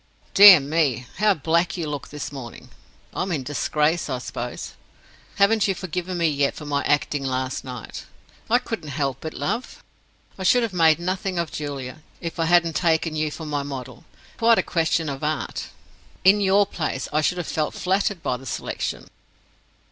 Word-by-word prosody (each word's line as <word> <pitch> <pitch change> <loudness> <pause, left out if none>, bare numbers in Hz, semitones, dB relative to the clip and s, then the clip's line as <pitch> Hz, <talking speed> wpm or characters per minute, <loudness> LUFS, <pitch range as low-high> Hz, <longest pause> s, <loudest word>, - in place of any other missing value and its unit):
"Dear 200 -4 +11
me, 140 -4 0
how 210 -1 +4
black 165 +3 0
you 165 -3 -3
look 145 -2 -5
this 150 0 -6
morning! 130 -5 -9 0.4
I'm 190 - -2
in 150 -6 -1
disgrace, 150 +4 0
I 130 - -1
suppose. 125 -1 -6 0.6
Haven't 205 +2 +3
you 195 - 0
forgiven 180 0 -4
me 170 -1 +2
yet 140 -2 +1
for 150 - -8
my 145 -1 -1
acting 145 -1 +1
last 130 0 -2
night? 125 -3 -8 0.4
I 240 - +5
couldn't 225 -11 -5
help 140 -2 -2
it, 160 - -5
love; 230 +6 -4 0.6
I - - -3
should 245 +6 +4
have 225 -4 -2
made 160 -3 +5
nothing 185 +2 -2
of 170 -2 -2
Julia, 145 -1 -6 0.2
if 170 -1 -6
I 165 - +2
hadn't 170 -1 +3
taken 165 -2 +1
you 155 0 0
for 160 +2 -8
my 145 -1 -2
model. 130 -3 -7 0.3
It's - - -26
quite 230 0 +5
a - - +2
question 165 -1 0
of 140 0 -5
Art. 150 -1 -2 0.6
In 195 +3 +6
your 200 +1 +4
place, 155 -8 -3
I 155 - +3
should 180 +4 0
have 175 - -3
felt 155 -1 -2
flattered 190 -1 0
by 125 - -1
the 135 +1 -12
selection." - - -4
160 Hz, 180 wpm, -23 LUFS, 140-180 Hz, 0.6 s, Dear